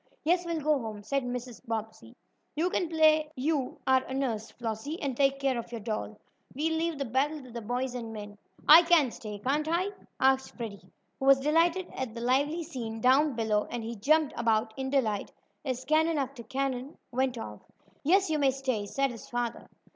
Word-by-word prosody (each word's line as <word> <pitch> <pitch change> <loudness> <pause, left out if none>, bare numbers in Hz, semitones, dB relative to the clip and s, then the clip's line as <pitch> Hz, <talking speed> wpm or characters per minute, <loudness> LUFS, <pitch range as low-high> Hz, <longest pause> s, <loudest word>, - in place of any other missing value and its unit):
"Yes, 350 +2 +2
we'll 335 -1 -1
go 300 -1 +2
home," 215 -3 -6
said 275 +6 0
Mrs. 245 -1 -5
Bobbsey. 220 - -5 0.4
"You 340 +4 +1
can 350 - 0
play 310 -1 +4
you 275 0 -1
are 260 0 +4
a 260 - -5
nurse, 230 -5 -2
Flossie, 235 +7 -5
and 275 -3 -2
take 275 +1 +2
care 270 -3 +1
of 235 - -8
your 235 - -4
doll. 215 -1 -4 0.4
We'll 320 +4 0
leave 330 -1 -1
the 275 - -2
battle 275 +5 0
to 255 - -12
the 235 0 -5
boys 245 +3 -2
and 235 -2 -5
men." 205 -1 -8 0.3
"I 320 +3 +11
can 330 -7 +4
stay, 210 -2 -7
can't 285 +8 0
I?" 355 +4 +1 0.3
asked 265 0 +2
Freddie, 220 -5 -7 0.3
who 270 - -2
was 275 -1 +7
delighted 330 +5 +2
at 250 -4 -4
the 235 - -5
lively 285 +7 +1
scene 235 -8 -5
down 265 +4 +4
below, 215 -2 +1
and 235 - -4
he 230 +1 -5
jumped 300 +7 +2
about 220 -2 +1
in 265 0 -3
delight 225 -7 0 0.3
as 260 -2 -3
cannon 315 +2 +3
after 270 -2 -3
cannon 265 +2 -3
went 255 0 0
off. 105 - -7 0.4
"Yes, 385 +6 +4
you 305 - +1
may 275 -2 +4
stay," 260 -6 -2
said 275 +5 0
his 230 - -10
father. 240 -1 -3
265 Hz, 195 wpm, -29 LUFS, 230-300 Hz, 0.4 s, I